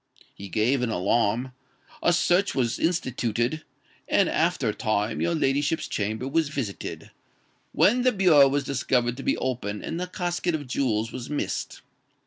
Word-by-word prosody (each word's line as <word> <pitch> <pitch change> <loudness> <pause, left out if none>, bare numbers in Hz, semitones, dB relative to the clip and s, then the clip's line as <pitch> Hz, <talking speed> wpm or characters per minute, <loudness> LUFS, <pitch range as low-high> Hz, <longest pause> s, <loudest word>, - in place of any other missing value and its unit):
He 100 0 -9
gave 120 +6 +1
an 125 - 0
alarm: 115 +5 +1 0.5
a - - +3
search 175 +3 +2
was 120 -3 0
instituted; 130 -4 -1 0.5
and, - - +3
after - - +1
a - - -1
time, 110 +1 -1
your 170 0 +1
ladyship's 145 +2 0
chamber 110 +4 -2
was 155 +1 +1
visited, 130 -9 -5 0.6
when 240 +6 +3
the 255 0 +4
bureau 175 - +6
was 140 +1 0
discovered 125 -3 0
to - - -6
be - - 0
open 115 -5 -3
and 165 - -4
the 180 - -3
casket 175 -1 -2
of 145 -2 -5
jewels 115 -4 -1
was 125 - -7
missed. 150 - -3
135 Hz, 155 wpm, -25 LUFS, 115-160 Hz, 0.6 s, bureau